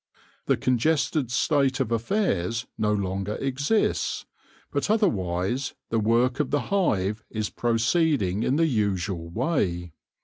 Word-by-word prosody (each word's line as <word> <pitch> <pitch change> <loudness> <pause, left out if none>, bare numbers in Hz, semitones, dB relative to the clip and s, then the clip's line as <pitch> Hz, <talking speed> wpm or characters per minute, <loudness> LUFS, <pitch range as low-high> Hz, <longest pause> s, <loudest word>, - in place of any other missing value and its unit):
The - - +3
congested 140 +1 +1
state 135 +1 +2
of 110 - -1
affairs 115 - 0
no 105 -1 0
longer 100 0 -1
exists, 140 +11 0 0.5
but - - -1
otherwise 120 - 0 0.2
the 115 - +2
work 120 +4 +2
of 150 - 0
the 145 - +1
hive 110 - +1
is 110 -1 -3
proceeding 115 - +1
in 130 - +1
the 165 +2 +3
usual 100 - -1
way. 90 - -1
115 Hz, 125 wpm, -26 LUFS, 100-140 Hz, 0.5 s, The